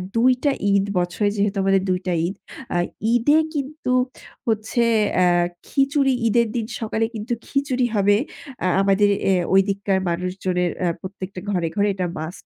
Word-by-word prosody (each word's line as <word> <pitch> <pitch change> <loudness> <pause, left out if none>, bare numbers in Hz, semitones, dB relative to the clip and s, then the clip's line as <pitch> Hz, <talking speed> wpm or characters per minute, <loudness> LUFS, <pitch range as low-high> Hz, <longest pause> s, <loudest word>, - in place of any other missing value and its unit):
২ 250 +3 +5
টা 285 - +3 0.2
ঈদ 200 0 +3
বছরে 180 +4 0
যেহেতু 200 0 0
আমাদের 195 0 +3
২ 180 0 +1
টা 180 - +1
ঈদ। 190 - -5 0.4
আ - - +3 0.4
ঈদে 265 +6 +4 0.2
কিন্তু 290 -1 -3 0.6
হচ্ছে 220 +2 0 0.3
অ্যাঁ 175 -1 +3 0.2
খিচুড়ি, 275 0 +2
ঈদের 235 +1 +3
দিন 230 -2 -1 0.2
সকালে 220 0 0
কিন্তু 220 +3 -3
খিচুড়ি 275 -3 0
হবে 205 0 +4 0.5
আ - - +3
আমাদের 200 +1 +3 0.4
ওইদিককার 195 0 +2
মানুষজনের 180 0 -1
এ্যা 175 - +2
প্রত্যেকটা 190 0 -7
ঘরে, 175 -4 0
ঘরে 205 0 +2
এটা 185 -2 -1
must। 160 +4 -7
200 Hz, 150 wpm, -22 LUFS, 185-235 Hz, 0.6 s, ২